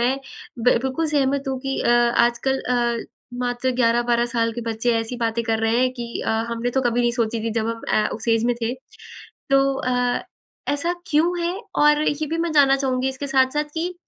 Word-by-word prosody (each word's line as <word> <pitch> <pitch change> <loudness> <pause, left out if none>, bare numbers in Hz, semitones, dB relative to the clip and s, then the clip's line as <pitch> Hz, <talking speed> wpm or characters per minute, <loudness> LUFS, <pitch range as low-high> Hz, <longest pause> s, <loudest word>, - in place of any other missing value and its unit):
मैं 250 +3 +2 0.4
ब 235 0 +3
बिल्कुल 290 +5 -1
सहमत 280 -1 +1
हूँ 265 -1 -2
कि 270 0 -3
अ, - - 0
आजकल 240 +2 +2
अ, 240 -1 0 0.4
मात्र 245 +1 -1
11-12 235 0 +2
साल 230 -1 0
के 240 - -5
बच्चे 225 +2 0
ऐसी 225 +2 -5
बातें 230 0 -1
कर 225 -1 0
रहे 225 +2 +2
हैं 255 0 +2
कि 240 -2 -6 0.2
अ, - - +1 0.2
हमने 235 +1 -2
तो 265 - +1
कभी 240 -1 +1
नहीं 240 0 +2
सोची 230 -2 -1
थी 230 - -1
जब 220 - -2 0.2
ए, - - +3
हम 215 - +2
उस 225 +1 -7
एज 225 0 +3
में 245 0 +2
थे। 235 +3 0 0.8
तो 275 0 +5
अ, 250 -2 0 0.5
ऐसा 335 +5 -1 0.2
क्यों 335 +4 +2
है? 345 +2 -1 0.2
और 295 0 +4
ये 305 +1 -1
भी 325 +3 -2
मैं 335 -1 -1
जानना 275 -2 +5
चाहूँगी 265 -1 0
इसके 265 +2 -5
साथ-साथ 270 +2 +2
कि 345 +3 -2
250 Hz, 205 wpm, -22 LUFS, 235-275 Hz, 0.8 s, तो